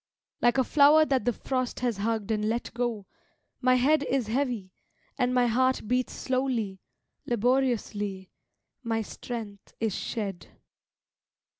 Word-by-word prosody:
Like 240 +2 +3
a 260 - +4
flower 300 +4 +6
that 265 -7 0
the 245 - +3
frost 255 +1 -3
has 240 -4 0
hugged 220 0 -1
and 215 0 0
let 235 +2 -2
go, 235 -4 -2 0.6
my 255 0 +4
head 280 +5 +3
Is 265 -2 +1
heavy, 230 -5 -2 0.4
and 250 0 +1
my 250 -1 +3
heart 255 0 +1
beats 250 +2 0
slowly, 250 -7 -1 0.5
laboriously, 230 -5 0 0.5
My 225 -3 -1
strength 215 -3 -8
is 225 -3 0
shed. 195 -7 -4
240 Hz, 130 wpm, -28 LUFS, 215-255 Hz, 0.6 s, flower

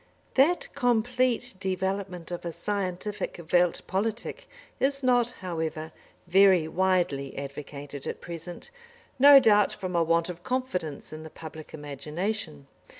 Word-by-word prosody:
That 305 +7 +3
complete 245 -1 +1
development 190 -2 -3
of 175 - -4
a 170 - -3
scientific 200 +1 -3
Welt 175 -1 +3
Politik 225 - -3 0.3
is 275 0 +1
not, 245 -2 +3
however, 160 -3 -3 0.3
very 185 -2 +5
widely 175 -6 0
advocated 140 0 -7
at - - -4
present, 175 - -8 0.5
no 280 +1 +10
doubt 210 -5 +5
from 185 -2 -5
a 170 - +4
want 165 0 +2
of 175 -1 -7
confidence 180 - -3
in 155 - -7
the 160 - -9
public 155 -1 -10
imagination. 150 - -4
185 Hz, 125 wpm, -27 LUFS, 160-220 Hz, 0.5 s, no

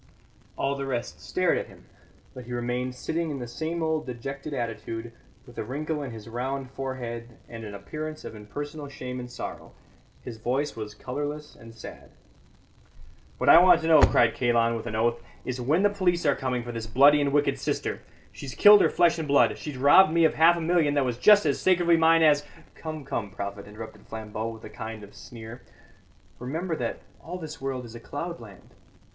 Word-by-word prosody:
All 135 - 0
the 140 -1 -4
rest 120 -3 -4
stared - - +1
at - - -6
him, - - -17 0.5
but 125 -2 -9
he 125 - -7
remained 125 +1 -2
sitting 165 +5 -2
in 145 - -4
the 120 -2 -6
same 160 +7 -3
old 160 -2 -1
dejected 135 +4 -6
attitude, 115 -2 -4 0.3
with - - -11
a - - -1
wrinkle 150 +6 -3
in 140 - -5
his 110 -2 -9
round 130 +3 -4
forehead 120 -3 -6
and 115 -1 -9
an 105 -2 -7
appearance 155 +10 -7
of - - -7
impersonal 145 +8 -7
shame 125 -2 -6
and 125 0 -7
sorrow; 125 - -8 0.5
his 115 -2 -7
voice 135 +6 -1
was 105 -2 -7
colourless 145 +3 -5
and 115 -1 -14
sad. 115 - -11 1.3
"What - - -2
I - - +10
want 180 -2 +6
to 160 - -2
know," 160 -3 +7
cried 115 -1 +5
Kalon, 115 -2 +2
with 115 +1 -5
an 110 - -4
oath, 120 +1 +1 0.2
"is 125 0 -3
when 155 +10 +2
the 205 - +5
police 180 -4 0
are 145 - +4
coming 125 -2 -2
for 120 - -6
this 115 -1 -5
bloody 140 +5 +6
and 140 -1 +1
wicked 145 +1 +1
sister. - - -2 0.3
She's 130 -4 -8
killed 205 0 +8
her - - +4
flesh 170 -1 +3
and 160 - -3
blood; 140 0 +4
she's 150 -4 -7
robbed 145 +7 +6
me 165 0 +4
of - - +3
half 165 +2 +5
a - - -3
million 160 -3 +2
that 140 -2 +2
was 125 -1 -3
just 205 +4 +6
as 140 -3 0
sacredly 175 -2 +4
mine 165 0 +5
as 150 -2 +5 0.2
" - - -26
"Come, 155 -3 -7
come, 120 -7 -3
prophet," 100 +1 -6
interrupted 110 +1 -10
Flambeau, 110 0 -5
with 110 -1 -10
a - - -8
kind 110 -2 -7
of 100 0 -13
sneer; 115 +3 -10 0.8
"remember 160 +7 -3
that - - -4 0.2
all 180 +2 -6
this 160 -2 -8
world 130 -2 -3
is 115 - -11
a 120 - -8
cloudland." 120 - -8
130 Hz, 200 wpm, -26 LUFS, 115-155 Hz, 1.3 s, I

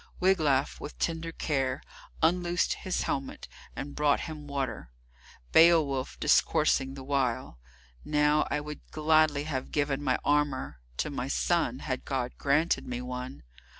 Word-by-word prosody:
Wiglaf, 160 -8 +2
with 150 - -8
tender 165 0 -2
care, 135 -4 -1 0.4
unloosed 175 +1 +2
his 185 - -2
helmet 135 -1 -3 0.3
and 140 +1 -6
brought 150 -1 +2
him 155 -3 -7
water, 140 - -3 0.6
Beowulf 155 -6 +4
discoursing 150 -3 +2
the 135 - -8
while: 130 - -1 0.4
"Now 150 0 +2
I 150 - -1
would 150 0 -8
gladly 155 -2 +3
have 140 -4 -4
given 145 -1 0
my 130 -3 +1
armour 140 - 0 0.2
to - - -1
my - - -3
son, - - 0
had - - -2
God - - -2
granted 150 +5 +1
me 125 -1 -3
one. 125 - -6
145 Hz, 135 wpm, -29 LUFS, 135-155 Hz, 0.6 s, Beowulf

